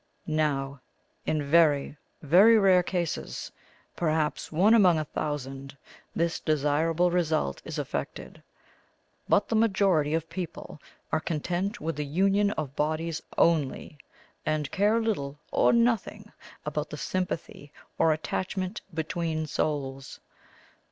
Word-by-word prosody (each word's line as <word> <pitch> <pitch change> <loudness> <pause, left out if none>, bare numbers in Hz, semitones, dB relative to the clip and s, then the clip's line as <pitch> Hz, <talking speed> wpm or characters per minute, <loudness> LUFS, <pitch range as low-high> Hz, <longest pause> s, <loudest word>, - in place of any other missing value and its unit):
Now, 140 -4 -1 0.5
in 155 -2 0
very, 150 -2 +3 0.3
very 195 +10 +7
rare 190 -3 +5
cases, 175 -2 -3 0.4
perhaps 155 -2 -1
one 190 +8 +4
among 185 -7 +6
a 155 - -1
thousand, 135 -2 -5 0.4
this 170 0 0
desirable 155 +3 +1
result 160 - 0
is - - -5
effected; - - -5 0.9
but - - +3
the 225 - -1
majority 190 -8 +2
of 165 0 -2
people 170 -3 -7 0.3
are - - +2
content 175 +7 -2
with 165 -5 -3
the 150 - -1
union 195 +6 +2
of 145 -3 -5
bodies 155 +2 -1 0.2
only, 150 -2 +1 0.4
and 155 -2 -1
care 210 +3 +2
little 145 -11 -2
or - - +4
nothing 235 -2 +1 0.3
about - - -3
the - - -6
sympathy 175 -5 -4 0.3
or 160 - +4
attachment 185 +5 -3
between 160 -1 -2
souls. 135 -3 -3
160 Hz, 120 wpm, -27 LUFS, 150-185 Hz, 0.9 s, very